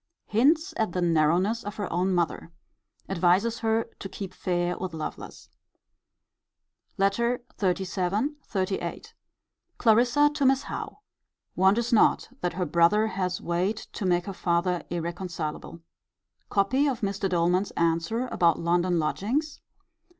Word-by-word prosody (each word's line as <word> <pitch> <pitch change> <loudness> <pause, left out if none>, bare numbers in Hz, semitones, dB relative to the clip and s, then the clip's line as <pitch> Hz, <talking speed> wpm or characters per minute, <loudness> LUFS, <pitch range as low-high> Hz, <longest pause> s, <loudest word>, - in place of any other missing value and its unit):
Hints 305 - +2
at 220 -6 0
the 180 - -1
narrowness 175 +7 +2
of 205 -1 -6
her 205 -3 -3
own 180 +2 +1
mother. 170 -1 -1 0.6
Advises 195 +5 +2
her 225 0 +1 0.2
to 195 - -6
keep 190 -1 -7
fair 175 -1 -1
with 185 -3 -5
Lovelace. 155 - -7 1.5
LETTER 235 +6 +1 0.2
XXXVII. 190 +4 0 0.2
XXXVIII. 190 -1 -2 0.7
Clarissa 245 +6 +4
to 295 -1 -2
Miss 270 +1 +3
Howe. - - -6 0.6
Wonders 220 +6 +3
not 220 - +4
that 175 - -1
her 180 +1 -1
brother 170 +7 +3
has 185 -3 -2
weight 180 +5 -1 0.2
to 195 - -2
make 175 -1 +2
her 200 - -5
father 175 0 0
irreconcilable. 170 -1 -5 0.7
Copy 255 +9 +2
of 255 -3 -2
Mr. 200 -1 -1
Doleman's 180 +2 +1
answer 170 +8 +1
about 170 -2 +3
London 175 +1 +1
lodgings. 240 - -1
190 Hz, 125 wpm, -26 LUFS, 175-225 Hz, 1.5 s, Clarissa